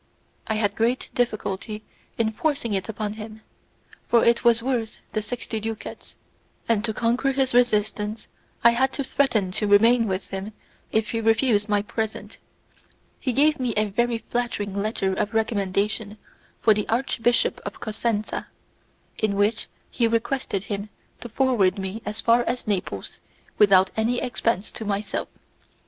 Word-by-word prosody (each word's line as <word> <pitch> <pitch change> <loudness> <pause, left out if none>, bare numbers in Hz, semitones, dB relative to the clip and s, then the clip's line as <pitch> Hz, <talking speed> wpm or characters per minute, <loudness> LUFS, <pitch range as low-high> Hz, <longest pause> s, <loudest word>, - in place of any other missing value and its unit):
I 220 - 0
had 205 -2 +1
great 235 +4 0
difficulty 215 -2 -2 0.3
in 225 -1 +1
forcing 240 -2 -1
it 195 +2 -2
upon 210 -1 -3
him, 215 0 -9 0.7
for 235 - +4
it 235 0 +3
was 235 -1 +4
worth 240 -4 -1
the 215 - -1
sixty 225 0 -4
ducats, 220 0 -7 0.5
and 225 -2 +2
to 220 - 0
conquer 240 +5 +1
his 265 -2 +1
resistance 215 -2 +1 0.4
I 235 - +8
had 265 +3 +1
to 280 - -2
threaten 240 -8 +1
to 210 +2 -1
remain 225 +3 +5
with 190 0 -3
him 195 +2 -5 0.4
if 220 0 +1
he 230 - -1
refused 225 -1 +3
my 205 -1 +2
present. 220 +1 -4 0.8
He 255 - -1
gave 300 +4 +3
me 245 -3 -1
a 215 0 +2
very 240 +3 +1
flattering 225 -4 -3
letter 200 -2 0
of 210 +3 -2
recommendation 210 0 0 0.4
for 220 - +5
the 210 0 -2
Archbishop 240 0 +1
of - - -7
Cosenza, 215 -1 -2 0.7
in 215 -2 +1
which 205 +3 +1 0.2
he 235 -2 +2
requested 230 -3 -1
him 205 +1 -4 0.3
to 240 - -8
forward 220 -6 +2
me 195 +3 -4
as 210 +1 -3
far 235 +1 +4
as 250 - -2
Naples 180 - -3 0.4
without 190 -2 +6
any 230 +3 +1
expense 230 -4 -1
to - - -6
myself. 205 0 -2
220 Hz, 150 wpm, -24 LUFS, 205-235 Hz, 0.8 s, I